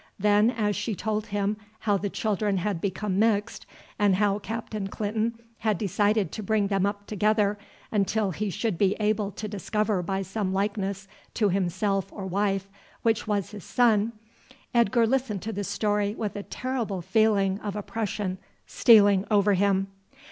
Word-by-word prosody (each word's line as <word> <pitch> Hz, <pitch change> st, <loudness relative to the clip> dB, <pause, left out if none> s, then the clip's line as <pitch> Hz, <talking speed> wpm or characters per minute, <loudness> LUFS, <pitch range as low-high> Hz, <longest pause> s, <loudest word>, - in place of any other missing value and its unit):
Then 210 Hz, +2 st, +4 dB
as 210 Hz, -4 st, 0 dB
she 205 Hz, +1 st, -2 dB
told 215 Hz, +2 st, -2 dB
him 205 Hz, 0 st, -1 dB, 0.2 s
how 205 Hz, -2 st, +2 dB
the 200 Hz, +1 st, -1 dB
children 205 Hz, -1 st, 0 dB
had 185 Hz, -2 st, -2 dB
become 195 Hz, 0 st, -1 dB
mixed, 220 Hz, 0 st, +1 dB, 0.3 s
and 205 Hz, -2 st, +4 dB
how 205 Hz, +1 st, +2 dB
Captain 220 Hz, -2 st, -4 dB
Clinton 220 Hz, +3 st, -2 dB, 0.2 s
had 215 Hz, -3 st, +1 dB
decided 205 Hz, +1 st, +1 dB
to 220 Hz, -, -5 dB
bring 210 Hz, -1 st, +1 dB
them 195 Hz, -1 st, +2 dB
up 205 Hz, 0 st, -4 dB
together 210 Hz, 0 st, +1 dB, 0.3 s
until 205 Hz, 0 st, +1 dB
he 210 Hz, +4 st, -2 dB
should 195 Hz, 0 st, -2 dB
be 200 Hz, -1 st, +3 dB
able 210 Hz, -1 st, +1 dB
to 215 Hz, -, -5 dB
discover 210 Hz, 0 st, -1 dB
by 195 Hz, +2 st, -2 dB
some 195 Hz, 0 st, -2 dB
likeness 200 Hz, 0 st, -2 dB, 0.3 s
to 210 Hz, -3 st, +2 dB
himself 195 Hz, +1 st, 0 dB
or 195 Hz, -, -7 dB
wife 195 Hz, +1 st, 0 dB, 0.4 s
which 225 Hz, -1 st, +1 dB
was 205 Hz, -3 st, -1 dB
his 205 Hz, -4 st, -9 dB
son, 230 Hz, -2 st, +2 dB, 0.6 s
Edgar 235 Hz, 0 st, +4 dB
listened 235 Hz, -5 st, -1 dB
to 225 Hz, -, -4 dB
the 205 Hz, -, -3 dB
story 205 Hz, 0 st, 0 dB
with 215 Hz, -3 st, -3 dB
a 205 Hz, -, -3 dB
terrible 230 Hz, -6 st, -3 dB
feeling 200 Hz, -2 st, +2 dB
of 205 Hz, -2 st, -5 dB
oppression 205 Hz, -3 st, -3 dB, 0.3 s
stealing 205 Hz, -4 st, +5 dB
over 205 Hz, -1 st, +4 dB
him. 195 Hz, 0 st, +2 dB
205 Hz, 160 wpm, -26 LUFS, 195-215 Hz, 0.6 s, stealing